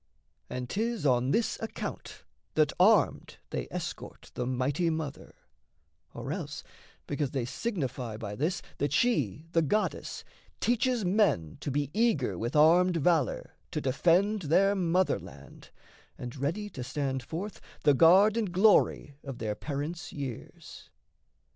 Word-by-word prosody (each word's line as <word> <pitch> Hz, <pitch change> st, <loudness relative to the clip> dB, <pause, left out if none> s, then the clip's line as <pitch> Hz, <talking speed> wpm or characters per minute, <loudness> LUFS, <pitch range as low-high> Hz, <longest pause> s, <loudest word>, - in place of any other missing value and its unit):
And 125 Hz, 0 st, -4 dB
'tis 225 Hz, -, -2 dB
on 125 Hz, -1 st, +3 dB
this 225 Hz, +10 st, +1 dB
account 225 Hz, -, -6 dB, 0.3 s
That 155 Hz, -1 st, +3 dB
armed 195 Hz, -2 st, +3 dB
they -, -, -3 dB
escort -, -, -7 dB
the 125 Hz, -, -3 dB
mighty 130 Hz, +7 st, 0 dB
Mother, 160 Hz, -3 st, -5 dB, 0.8 s
Or -, -, -5 dB
else -, -, -6 dB, 0.4 s
because 145 Hz, -1 st, -2 dB
they 130 Hz, -3 st, -2 dB
signify 125 Hz, -, -3 dB
by 105 Hz, -2 st, -6 dB
this 160 Hz, -, -1 dB, 0.2 s
That 145 Hz, -1 st, 0 dB
she, 155 Hz, -, +1 dB
the 165 Hz, -, +3 dB
goddess, 210 Hz, +8 st, -1 dB, 0.4 s
teaches 240 Hz, -2 st, +1 dB
men 175 Hz, -, +1 dB
to -, -, -3 dB
be 145 Hz, 0 st, -1 dB
Eager 200 Hz, -, +1 dB
with 115 Hz, -, -3 dB
armed 170 Hz, +4 st, +5 dB
valour 160 Hz, -5 st, +1 dB, 0.2 s
to -, -, -2 dB
defend 180 Hz, +10 st, +2 dB
Their 185 Hz, +6 st, +3 dB
motherland, 170 Hz, -, -2 dB, 0.5 s
and 120 Hz, -1 st, -7 dB
ready 165 Hz, +10 st, -2 dB
to 130 Hz, -, -6 dB
stand 135 Hz, 0 st, -2 dB
forth, 180 Hz, -, -6 dB, 0.2 s
The 145 Hz, -, +6 dB
guard 190 Hz, -, +6 dB
and 215 Hz, -5 st, -1 dB
glory 185 Hz, -7 st, +3 dB
of 135 Hz, -3 st, -7 dB
their 110 Hz, -2 st, -2 dB
parents' 150 Hz, +8 st, -5 dB
years. 135 Hz, -6 st, -8 dB
155 Hz, 135 wpm, -29 LUFS, 130-190 Hz, 0.8 s, The